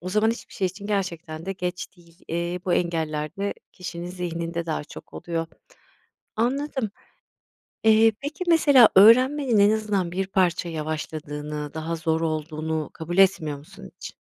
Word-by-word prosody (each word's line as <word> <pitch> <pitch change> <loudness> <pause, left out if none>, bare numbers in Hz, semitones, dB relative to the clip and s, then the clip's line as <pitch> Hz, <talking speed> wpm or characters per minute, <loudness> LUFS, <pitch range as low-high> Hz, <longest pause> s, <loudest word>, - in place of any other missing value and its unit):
o 180 - -6
zaman 215 +4 +2
hiçbir 230 - -7
şey 190 - 0
için 195 +3 -7
gerçekten 170 -5 -3
de 195 - -1
geç 180 -1 -4
değil. 170 0 -22
Eee, 170 +2 -2
bu 180 - 0
engeller 160 -3 -1
de 200 +1 -2 0.2
kişinin 175 -1 -7
zihninde 170 -1 -4
daha 155 -2 -2
çok - - -12
oluyor. 165 -1 -3 0.9
Anladım. 260 -1 -1 0.9
Eee, 220 0 +6
peki, 295 +5 -4
mesela 285 -8 +7
öğrenmenin 250 +5 +6
en 200 0 +6
azından 210 -5 0
bir 190 +2 -2
parça 180 -2 +1
yavaşladığını, 150 -1 -5
daha 160 +1 -3
zor 160 0 0
olduğunu 155 -1 -2
kabul 170 +2 -5
etmiyor 175 -7 +3
musun 190 +6 -13
hiç? - - -9
175 Hz, 145 wpm, -24 LUFS, 160-205 Hz, 0.9 s, mesela